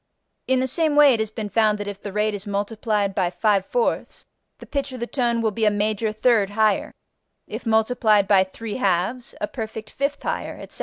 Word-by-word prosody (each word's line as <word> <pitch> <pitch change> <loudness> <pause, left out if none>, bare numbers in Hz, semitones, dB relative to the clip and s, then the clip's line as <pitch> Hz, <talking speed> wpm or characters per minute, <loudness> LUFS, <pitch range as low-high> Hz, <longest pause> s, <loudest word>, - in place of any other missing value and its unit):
In 260 0 +3
the - - +1
same 305 +3 +1
way 295 -2 +7
it 230 - 0
has 220 -1 -1
been 215 -1 -5
found 215 -1 +2
that 205 0 -5
if 200 -1 -6
the 205 - -6
rate 210 +1 0
is 205 +1 -6
multiplied 205 0 -1
by 185 -3 +1
5/4 200 - 0 0.3
the - - -12
pitch 280 -2 -3
of 255 - -7
the 235 - -2
tone 240 -2 0
will 220 - +2
be 220 +2 -3
a 215 - +6
major 210 +1 0
third 215 -2 +2
higher; 215 -1 +1 0.5
if - - -7
multiplied 220 -2 +3
by 195 -2 +5
3/2, 205 +2 -2
a 315 - 0
perfect 220 -6 -7
fifth 280 +1 -2
higher, - - -3
etc. - - -8
215 Hz, 200 wpm, -23 LUFS, 205-240 Hz, 0.5 s, way